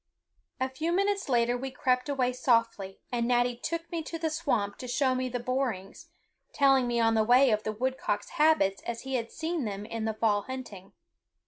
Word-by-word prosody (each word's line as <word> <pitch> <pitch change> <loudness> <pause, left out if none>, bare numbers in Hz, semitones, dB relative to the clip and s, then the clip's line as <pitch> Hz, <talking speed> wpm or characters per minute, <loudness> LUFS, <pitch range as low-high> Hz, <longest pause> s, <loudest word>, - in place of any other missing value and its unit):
A 260 - +1
few 310 +6 -3
minutes 395 -1 0
later 240 -1 +2
we 265 +2 -4
crept 255 +1 0
away 255 -3 +1
softly, 230 -6 0
and 235 -1 0
Natty 245 0 +2
took 335 +7 -4
me 335 -1 -2
to 330 +1 -6
the 320 -1 -2
swamp 245 -11 -1
to 250 - -6
show 260 +1 +1
me 255 0 -1
the 245 0 -3
borings, 250 - -3 0.5
telling 270 -3 +4
me 240 -1 0
on 225 -1 +3
the 220 -1 +3
way 250 +3 +5
of 215 0 +1
the 215 - -3
woodcock's 220 -2 -2
habits 305 - +2
as 235 -1 -3
he 265 0 -6
had 235 -3 -2
seen 320 -1 -3
them 205 -1 -4
in 225 0 -4
the 220 -1 -2
fall 215 -2 +2
hunting. 230 -8 -8
250 Hz, 200 wpm, -29 LUFS, 225-275 Hz, 0.5 s, way